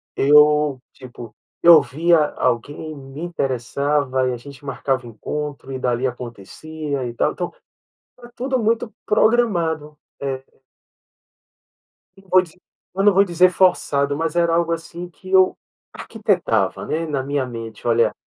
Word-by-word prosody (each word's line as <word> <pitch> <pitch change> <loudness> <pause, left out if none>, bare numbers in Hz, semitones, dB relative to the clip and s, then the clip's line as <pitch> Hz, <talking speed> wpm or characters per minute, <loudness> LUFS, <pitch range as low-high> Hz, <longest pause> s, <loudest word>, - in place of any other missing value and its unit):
Eu 150 -1 +4
tipo, 120 -3 -11 0.3
eu 170 -2 +8
via 165 +4 +2 0.2
alguém, 145 +6 -2
me 135 0 -11
interessava 140 -3 -1
e - - -2
a - - -4
gente 140 +3 -13
marcava 135 -1 -2
encontro 140 +5 -6
e - - -3
dali 125 0 0
acontecia 130 +5 -6
e 120 - -5
tal, - - 0
então 175 - -5 0.7
era 240 -1 -13
tudo 260 +1 -1
muito 225 +1 0
programado, 175 -10 +1 0.2
é. 135 -1 -3 1.7
Não 195 0 -20
vou 185 0 +5
dizer 180 0 -15 0.3
eu 195 - 0
não 205 -1 +5
vou 195 +1 +5
dizer 180 -1 +4
forçado, 145 -6 +2
mas 165 0 -2
era 170 -1 +2
algo, 170 0 +1
assim, 170 +1 -5
que 185 +2 -14
eu 190 -1 +4 0.4
arquitetava 170 - -1
né, 165 +1 -2
na 145 -4 -2
minha 140 -1 -2
mente, 115 -3 -8
olha 115 -1 +3
150 Hz, 140 wpm, -21 LUFS, 130-175 Hz, 1.7 s, eu